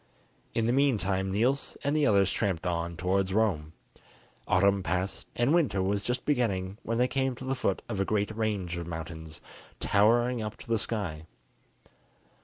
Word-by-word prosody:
In 115 Hz, -, +2 dB
the 120 Hz, -, +2 dB
meantime 100 Hz, -9 st, +1 dB
Niels 125 Hz, +8 st, 0 dB
and 145 Hz, +1 st, +1 dB
the 150 Hz, -2 st, +3 dB
others 100 Hz, -3 st, +4 dB
tramped 95 Hz, -6 st, -1 dB
on 85 Hz, -1 st, -2 dB
towards 95 Hz, +2 st, 0 dB
Rome. 85 Hz, -9 st, +1 dB, 0.7 s
Autumn 100 Hz, +1 st, +3 dB
passed, 95 Hz, +2 st, -2 dB
and 120 Hz, +5 st, +2 dB
winter 155 Hz, -, +2 dB
was 100 Hz, +2 st, 0 dB
just 125 Hz, +4 st, -2 dB
beginning 100 Hz, -8 st, 0 dB
when 115 Hz, +1 st, -2 dB
they 125 Hz, +1 st, +3 dB
came 130 Hz, -1 st, 0 dB
to 130 Hz, -, -8 dB
the 135 Hz, -, 0 dB
foot 125 Hz, -7 st, -1 dB
of 100 Hz, -5 st, -3 dB
a -, -, +4 dB
great 105 Hz, +1 st, -1 dB
range 100 Hz, -6 st, -1 dB
of 85 Hz, -1 st, -5 dB
mountains, 80 Hz, -2 st, -7 dB, 0.4 s
towering 120 Hz, +4 st, +3 dB
up 110 Hz, 0 st, -5 dB
to -, -, -13 dB
the 115 Hz, -1 st, +1 dB
sky. 85 Hz, -10 st, -3 dB
100 Hz, 170 wpm, -29 LUFS, 95-120 Hz, 0.7 s, others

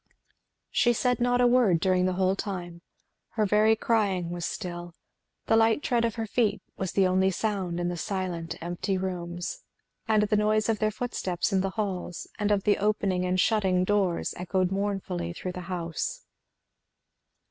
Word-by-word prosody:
She 240 Hz, -, +3 dB
said 250 Hz, +1 st, +1 dB
not 245 Hz, 0 st, +2 dB
a -, -, +5 dB
word 240 Hz, -8 st, +4 dB
during 185 Hz, 0 st, +2 dB
the 185 Hz, -, 0 dB
whole 190 Hz, 0 st, +2 dB
time; 175 Hz, -4 st, -5 dB, 0.5 s
her 215 Hz, -2 st, +1 dB
very 215 Hz, +2 st, +4 dB
crying; 200 Hz, -7 st, 0 dB
was 175 Hz, -1 st, -3 dB
still; 175 Hz, -3 st, -6 dB, 0.5 s
the -, -, +3 dB
light 225 Hz, +4 st, +3 dB
tread 235 Hz, -2 st, +2 dB
of 230 Hz, -, -2 dB
her 225 Hz, -, -2 dB
little 215 Hz, -, -9 dB
feet 215 Hz, -4 st, +2 dB
was 190 Hz, -2 st, -3 dB
the 195 Hz, -, +4 dB
only 185 Hz, +1 st, +3 dB
sound 190 Hz, -3 st, -2 dB
in 175 Hz, -, -1 dB
the 175 Hz, -, -2 dB
silent 175 Hz, -2 st, -3 dB
empty 175 Hz, +3 st, -2 dB
rooms; 175 Hz, -2 st, -4 dB, 0.5 s
and 215 Hz, -1 st, +4 dB
the 210 Hz, 0 st, +1 dB
noise 215 Hz, +1 st, +2 dB
of 220 Hz, -, +1 dB
their 215 Hz, -, +2 dB
footsteps 200 Hz, -6 st, -2 dB
in 190 Hz, -, +3 dB
the 195 Hz, -, -1 dB
halls 185 Hz, -4 st, -3 dB
and 210 Hz, -1 st, +1 dB
of 205 Hz, -2 st, +2 dB
the 205 Hz, -, +2 dB
opening 195 Hz, -3 st, +1 dB
and 180 Hz, 0 st, 0 dB
shutting 190 Hz, -4 st, +2 dB
doors 190 Hz, -3 st, +1 dB
echoed 185 Hz, +1 st, 0 dB
mournfully 195 Hz, -3 st, -2 dB
through 180 Hz, +1 st, -5 dB
the 180 Hz, -, -6 dB
house. 170 Hz, -3 st, -3 dB
190 Hz, 175 wpm, -27 LUFS, 180-215 Hz, 0.5 s, a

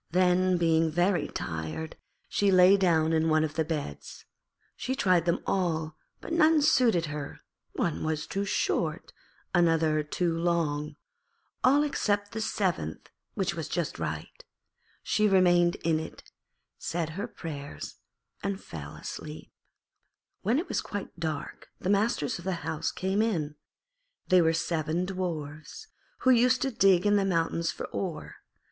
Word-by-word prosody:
Then, 180 Hz, +1 st, +3 dB
being 165 Hz, -1 st, +3 dB
very 175 Hz, +4 st, +1 dB
tired, 80 Hz, -, -5 dB, 0.3 s
she 205 Hz, -, +1 dB
lay 185 Hz, +1 st, +7 dB
down 165 Hz, -4 st, +2 dB
in 160 Hz, 0 st, +2 dB
one 155 Hz, 0 st, +3 dB
of 155 Hz, -1 st, -2 dB
the 160 Hz, -, +1 dB
beds. 150 Hz, -, -5 dB, 0.5 s
She 260 Hz, -, -3 dB
tried 180 Hz, -, +3 dB
them 170 Hz, -, +1 dB
all 160 Hz, -4 st, -1 dB, 0.2 s
but -, -, -6 dB
none 320 Hz, -2 st, +5 dB
suited 240 Hz, -, +4 dB
her; 145 Hz, -2 st, -6 dB, 0.3 s
one 165 Hz, -, -1 dB
was 155 Hz, -1 st, -1 dB
too 195 Hz, -, -2 dB
short, 170 Hz, -4 st, -1 dB, 0.4 s
another 165 Hz, -3 st, +3 dB
too 165 Hz, +3 st, -1 dB
long, 165 Hz, -3 st, 0 dB, 0.7 s
all 280 Hz, +3 st, +5 dB
except 205 Hz, -8 st, 0 dB
the 220 Hz, -, -4 dB
seventh, 180 Hz, -, -2 dB, 0.2 s
which -, -, 0 dB
was -, -, -4 dB
just -, -, -2 dB
right. -, -, -5 dB, 0.6 s
She 215 Hz, -, +2 dB
remained 175 Hz, -3 st, +4 dB
in 160 Hz, -1 st, +2 dB
it, 160 Hz, -, -9 dB, 0.5 s
said 165 Hz, -1 st, -2 dB
her 200 Hz, +8 st, -4 dB
prayers, 145 Hz, -9 st, -7 dB, 0.4 s
and 200 Hz, -1 st, -2 dB
fell 75 Hz, -, -9 dB
asleep. -, -, -8 dB, 0.9 s
When 225 Hz, +7 st, +2 dB
it 335 Hz, -, -2 dB
was -, -, -1 dB
quite 205 Hz, -4 st, -7 dB
dark 155 Hz, -3 st, -4 dB
the 185 Hz, -, 0 dB
masters 200 Hz, -7 st, +1 dB
of 170 Hz, -, -11 dB
the 185 Hz, -3 st, -3 dB
house 160 Hz, 0 st, -2 dB
came 190 Hz, +3 st, 0 dB
in. 165 Hz, -10 st, 0 dB, 0.8 s
They 185 Hz, -1 st, +6 dB
were 160 Hz, -1 st, +4 dB
seven 165 Hz, +1 st, -1 dB
Dwarfs, 170 Hz, -, -5 dB, 0.3 s
who 260 Hz, -, +5 dB
used 250 Hz, +1 st, +4 dB
to 270 Hz, -, 0 dB
dig 195 Hz, -5 st, +4 dB
in 205 Hz, 0 st, +4 dB
the 200 Hz, -, +2 dB
mountains 165 Hz, -2 st, 0 dB
for -, -, -6 dB
ore. 180 Hz, -5 st, -5 dB
175 Hz, 145 wpm, -28 LUFS, 160-195 Hz, 0.9 s, lay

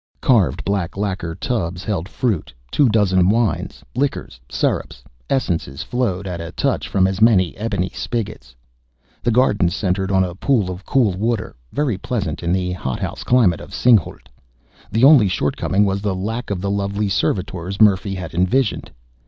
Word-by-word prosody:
Carved 110 Hz, -, +2 dB
black 100 Hz, -3 st, -2 dB
lacquer 95 Hz, -5 st, -3 dB
tubs 90 Hz, -7 st, -3 dB
held 95 Hz, -4 st, -3 dB
fruit; 110 Hz, -, -2 dB, 0.2 s
two 140 Hz, -4 st, +3 dB
dozen 95 Hz, -4 st, +3 dB
wines, 115 Hz, +1 st, 0 dB
liquors, 135 Hz, -, -2 dB
syrups, -, -, -2 dB, 0.3 s
essences 85 Hz, -, -1 dB
flowed 105 Hz, -7 st, -2 dB
at 90 Hz, -3 st, -4 dB
a 85 Hz, +1 st, -6 dB
touch -, -, -1 dB
from 95 Hz, -1 st, +2 dB
as 95 Hz, +1 st, -1 dB
many 95 Hz, -7 st, +4 dB
ebony 100 Hz, -4 st, -2 dB
spigots. 105 Hz, -, -5 dB, 0.7 s
The -, -, 0 dB
garden 110 Hz, -7 st, +3 dB
centered 95 Hz, +2 st, -1 dB
on 95 Hz, -1 st, +3 dB
a 90 Hz, -1 st, -3 dB
pool 100 Hz, -1 st, +1 dB
of 90 Hz, +2 st, -9 dB
cool 125 Hz, -7 st, +3 dB
water, 110 Hz, +1 st, -2 dB, 0.2 s
very 130 Hz, -10 st, -1 dB
pleasant 95 Hz, -9 st, -3 dB
in 85 Hz, -, -1 dB
the 90 Hz, 0 st, 0 dB
hothouse 65 Hz, -8 st, -4 dB
climate 110 Hz, -10 st, +3 dB
of -, -, -9 dB
Singhalût. 115 Hz, -9 st, +2 dB, 0.7 s
The 110 Hz, +4 st, +1 dB
only 135 Hz, -7 st, +7 dB
shortcoming 95 Hz, +3 st, 0 dB
was 100 Hz, 0 st, -1 dB
the 100 Hz, -2 st, -1 dB
lack 110 Hz, +6 st, -4 dB
of 95 Hz, -3 st, -2 dB
the 100 Hz, 0 st, -1 dB
lovely 100 Hz, +1 st, -1 dB
young -, -, -1 dB
servitors 95 Hz, -1 st, -2 dB
Murphy 100 Hz, -2 st, +3 dB
had 90 Hz, -4 st, -6 dB
envisioned. 100 Hz, +8 st, +1 dB
100 Hz, 160 wpm, -20 LUFS, 90-115 Hz, 0.7 s, only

